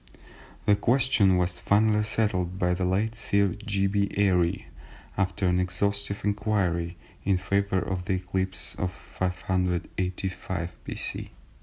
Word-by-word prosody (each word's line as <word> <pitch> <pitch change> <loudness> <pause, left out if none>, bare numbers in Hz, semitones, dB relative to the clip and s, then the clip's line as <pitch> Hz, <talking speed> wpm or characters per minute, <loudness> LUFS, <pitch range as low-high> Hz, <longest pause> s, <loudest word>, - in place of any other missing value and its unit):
The 105 - +5
question 115 -6 +3
was 90 0 0
finally 105 +1 +3
settled 95 -5 0
by 90 -1 +2
the 90 +1 -1
late 100 +5 +1
Sir 100 -3 +2
G. 100 -2 0
B. 100 0 +1
Airy, 90 -4 +2 0.5
after 95 +1 0
an 90 0 +3
exhaustive 100 +3 -1
inquiry, 95 -5 0 0.3
in 95 -1 +2
favour 100 +1 0
of 90 -1 -2
the 95 - 0
eclipse 95 0 -2
of 90 0 0
585 90 0 -2
B.C. - - -4
95 Hz, 125 wpm, -27 LUFS, 90-100 Hz, 0.5 s, The